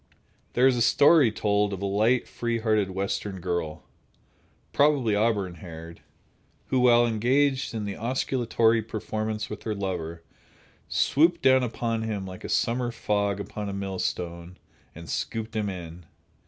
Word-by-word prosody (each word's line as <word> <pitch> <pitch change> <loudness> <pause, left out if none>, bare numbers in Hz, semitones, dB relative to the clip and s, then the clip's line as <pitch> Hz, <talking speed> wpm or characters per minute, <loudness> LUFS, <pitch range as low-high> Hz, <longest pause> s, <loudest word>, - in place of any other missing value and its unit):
There 125 - +3
is 130 -1 +5
a - - 0
story 145 0 +5
told 105 -1 +1
of 95 - -5
a - - 0
light, 110 +5 +2
free 120 -1 -2
hearted 110 -3 +1
Western 95 +1 -3
girl—probably 95 - -2
auburn 105 -4 +1
haired—who, 85 +8 -8
while 120 -1 +5
engaged 130 +4 +1
in 110 -2 -3
the 100 -1 -4
osculatory 115 -1 +1
performance 110 0 -4
with 105 - -7
her 110 -2 -3
lover, 85 -4 -4 0.7
swooped 165 +5 +2
down 130 0 +5
upon 115 -2 -2
him 105 -3 -3
like 95 -1 -9
a - - -6
summer 120 +1 0
fog 100 -3 -1
upon 105 +1 -5
a - - -4
millstone 90 -3 -4 0.4
and 85 0 -10
scooped 115 0 -4
him 105 -2 -1
in. 85 -2 -8
105 Hz, 140 wpm, -26 LUFS, 95-120 Hz, 0.7 s, is